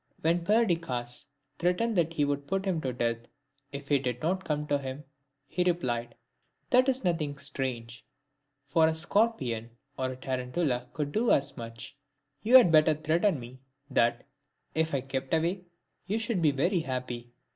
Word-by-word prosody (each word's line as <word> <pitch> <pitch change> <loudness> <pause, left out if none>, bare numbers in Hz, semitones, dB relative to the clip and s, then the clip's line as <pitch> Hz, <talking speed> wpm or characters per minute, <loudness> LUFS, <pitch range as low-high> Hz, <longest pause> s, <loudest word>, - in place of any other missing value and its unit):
* - - -33
When 170 +2 +2
Perdiccas 165 - 0 0.3
threatened 180 +7 +1
that 165 -2 +2
he 150 -3 +2
would 145 0 -2
put 195 +3 -1
him 180 -5 0
to 130 - -2
death 115 -1 0 0.5
if 140 0 -7
he 145 -2 +4
did 125 -2 -2
not 185 +3 0
come 150 -2 -1
to 145 -1 +1
him, 135 +1 -6 0.4
he 180 +6 0
replied, 120 -10 -1 0.6
"That 255 +2 +5
is 265 -1 0
nothing 160 -6 0
strange, 120 -4 -4 0.6
for 160 +3 +4
a 160 - 0
scorpion 160 - 0 0.3
or 130 0 0
a 130 - -5
tarantula 125 0 -2
could 145 -1 -2
do 230 +6 +1
as 140 0 +2
much: 115 +3 -8 0.5
you 240 +4 +4
had 210 -10 +6
better 155 0 +6
threaten 155 +3 +1
me 125 +2 -10 0.3
that, 120 -1 +2 0.5
if 160 -1 +1
I 135 - 0
kept 135 +2 -2
away, 175 +3 -1 0.4
you 205 +3 0
should 225 -4 -1
be 155 - +5
very 170 +7 +1
happy." 125 -4 -4
150 Hz, 165 wpm, -29 LUFS, 130-175 Hz, 0.6 s, had